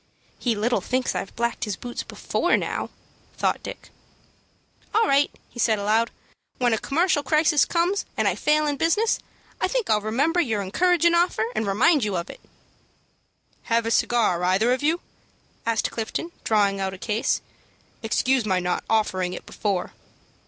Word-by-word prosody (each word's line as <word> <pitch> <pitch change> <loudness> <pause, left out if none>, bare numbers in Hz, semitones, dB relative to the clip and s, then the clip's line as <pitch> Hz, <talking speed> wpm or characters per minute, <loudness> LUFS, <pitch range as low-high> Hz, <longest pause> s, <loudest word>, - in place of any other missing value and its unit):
"He 240 -3 0
little 230 +4 0
thinks 255 0 -1
I've - - -5
blacked 235 0 -1
his 210 -2 -3
boots 240 +5 -6
before - - 0
now," - - -3 0.5
thought - - 0
Dick. - - -9 1.0
"All 445 +1 +5
right," 280 +1 +4 0.3
said 225 -2 +2
he, - - -4
aloud. 220 +3 +2 0.5
"When 245 -2 +2
a 220 - +1
commercial 320 +1 +1
crisis 305 +1 +3
comes, 355 +4 0
and - - +2
I - - +3
fail 305 0 +2
in 290 -1 -1
business, 415 +9 +2 0.4
I - - +3
think - - -1
I'll 210 -1 +3
remember 280 +11 +1
your 220 -9 -1
encouragin' 340 - +3
offer, 340 -10 +2
and 215 -1 -1
remind 245 - +3
you 205 -3 -1
of 170 - -4
it." - - -14 1.3
"Have 230 0 +1
a 230 - -1
cigar 220 -8 +2
either 195 +7 +3
of 255 - -2
you?" 320 +4 +1 0.7
asked 230 -1 +1
Clifton, 235 +9 -4
drawing 200 -2 +2
out 190 0 -2
a - - -11
case. 215 +3 -1 0.6
"Excuse 250 +3 +1
my 190 -3 +1
not 180 0 -1
offering 190 -5 +1
it - - -8
before." 195 -4 -2
235 Hz, 165 wpm, -24 LUFS, 210-305 Hz, 1.3 s, All